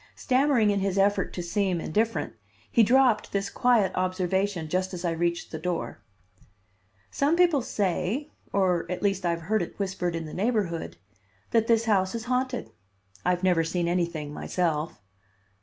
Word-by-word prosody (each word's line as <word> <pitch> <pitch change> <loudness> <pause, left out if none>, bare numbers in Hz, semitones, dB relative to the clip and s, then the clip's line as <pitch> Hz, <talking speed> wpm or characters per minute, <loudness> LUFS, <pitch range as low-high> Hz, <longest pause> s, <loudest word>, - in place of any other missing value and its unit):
Stammering 255 -5 +3
in 200 - +1
his 195 0 -1
effort 200 +1 +2
to 175 - -4
seem 185 0 0
indifferent, 220 +8 -1 0.4
he 235 - +5
dropped 245 0 +4
this 200 0 -2
quiet 240 -6 +3
observation 185 -1 -1
just 185 +3 -1
as 175 0 -5
I 170 - +1
reached 170 +1 -1
the 160 - -5
door. 175 +1 -3 1.1
"Some 290 +4 +2
people 340 -5 +4
say, 210 - -1 0.2
or 180 -4 +1
at 180 - -4
least 195 -3 +1
I - - +2
have 170 0 -1
heard 215 +6 0
it - - -6
whispered 185 -3 -2
in 165 -1 -4
the 155 - -8
neighborhood, 185 - -1 0.5
that 225 -1 +3
this 230 -1 +3
house 195 -2 +2
is 230 0 -4
haunted. 255 0 -1 0.5
I've 180 0 0
never 175 -3 +3
seen 170 +1 -1
anything, 170 -4 -1
myself." 160 - -2
190 Hz, 160 wpm, -27 LUFS, 175-225 Hz, 1.1 s, he